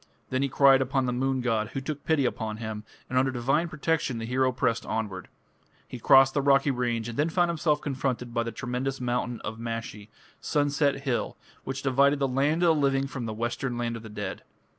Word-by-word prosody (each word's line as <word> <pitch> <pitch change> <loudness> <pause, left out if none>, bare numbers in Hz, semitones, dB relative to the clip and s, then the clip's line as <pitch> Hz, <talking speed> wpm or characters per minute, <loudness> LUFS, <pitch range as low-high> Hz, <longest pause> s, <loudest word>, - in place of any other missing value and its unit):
Then 130 +1 0
he 140 - 0
cried 135 0 +5
upon 135 0 0
the 125 - -1
moon 130 +1 0
god, 115 -3 0
who - - -2
took 145 +2 -5
pity 155 -4 +2
upon 110 -3 -2
him, 110 -1 -5 0.2
and 130 - +1
under 130 +1 +2
divine 135 +6 0
protection 155 -4 -1
the 115 - -4
hero 130 +2 +1
pressed 115 -1 0
onward. 100 -5 -4 0.6
He 125 - -8
crossed 135 +3 +6
the 145 - +1
rocky 140 0 +4
range 120 -3 -1
and 120 +3 -6
then 155 +3 +2
found 175 +1 +2
himself 155 -2 0
confronted 130 -3 -3
by 115 - +1
the 115 0 -3
tremendous 125 +4 -3
mountain 125 -1 -2
of 110 +2 -6
Mashi 115 -2 -5 0.3
"Sunset 145 -1 +1
hill", 130 -4 -2 0.3
which 135 +1 -4
divided 140 +2 +3
the 140 -1 +1
land 145 +6 +1
of - - +5
the 150 - 0
living 135 -1 +2
from 130 -4 -5
the - - -3
western 120 +2 -2
land 120 -1 -2
of 115 - -7
the 110 - -10
dead. 105 -2 -5
130 Hz, 210 wpm, -27 LUFS, 115-140 Hz, 0.6 s, crossed